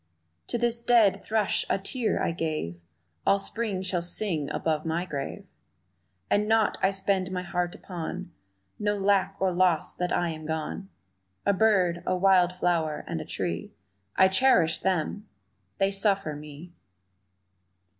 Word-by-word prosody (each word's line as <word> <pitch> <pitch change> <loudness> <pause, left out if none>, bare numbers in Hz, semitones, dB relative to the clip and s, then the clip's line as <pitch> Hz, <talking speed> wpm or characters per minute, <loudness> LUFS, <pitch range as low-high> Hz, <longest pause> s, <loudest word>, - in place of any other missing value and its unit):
To - - -1
this 235 0 0
dead 225 -5 +4
thrush 215 -2 +1
a - - +2
tear 220 +4 -1
I - - +1
gave 155 - -3 0.4
All 200 - +4
Spring 200 -2 -3
shall 185 -2 -1
sing 170 -4 0
above 155 -1 -1
my 165 +2 -1
grave, 140 -6 -5 0.8
And 210 +1 +2
naught 220 -1 +2
I 190 - +4
spend 195 -1 0
my 180 -1 -3
heart 175 0 -2
upon 180 0 -6 0.5
Know 205 0 +1
lack 195 -1 +2
or 190 -1 +2
loss 180 -3 +2
that 180 0 -2
I 175 -1 +1
am 155 -1 -6
gone 160 +4 -4 0.6
A 200 - +4
bird, 185 -4 +3
a - - +2
wild 180 -1 +4
flower 165 -4 0
and 165 -1 -3
a - - -7
tree, 85 -9 -4 0.4
I 190 - +6
cherish 190 -5 +3
them; 190 +3 -1 0.5
they 195 0 +2
suffer 195 -5 +1
me! 150 +3 -10
185 Hz, 145 wpm, -27 LUFS, 165-200 Hz, 0.8 s, I